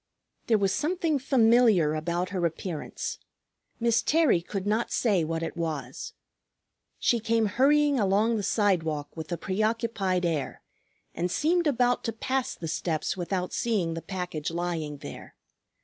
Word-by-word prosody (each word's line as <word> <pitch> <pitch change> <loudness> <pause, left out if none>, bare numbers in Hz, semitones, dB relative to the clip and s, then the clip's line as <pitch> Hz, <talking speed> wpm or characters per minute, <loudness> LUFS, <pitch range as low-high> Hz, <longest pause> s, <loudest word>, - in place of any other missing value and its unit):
There 225 - +4
was 195 -2 +1
something 325 - 0
familiar 230 - +4
about 170 +3 -2
her 185 -2 -2
appearance, 165 -1 -5 0.6
Miss 230 -1 +3
Terry 305 - +3
could 195 +2 -5
not 215 +3 0
say 200 -8 +2
what 165 +1 -2
it 165 - -4
was. 155 -7 -4 0.8
She 240 - +2
came 225 0 +1
hurrying 285 +5 +3
along 210 +3 +2
the 215 - -1
sidewalk 170 -8 0
with 160 -1 -7
a 175 - -1
preoccupied 205 -2 0
air, 155 -6 -2 0.5
and 175 +2 -1
seemed 335 - +1
about 245 -3 +2
to 230 - -1
pass 260 +3 -2
the 165 - -6
steps 160 0 -1
without 180 0 -3
seeing 200 -8 0
the 165 - -5
package 180 -5 -4
lying 165 -3 -3
there. - - -10
195 Hz, 145 wpm, -27 LUFS, 170-235 Hz, 0.8 s, There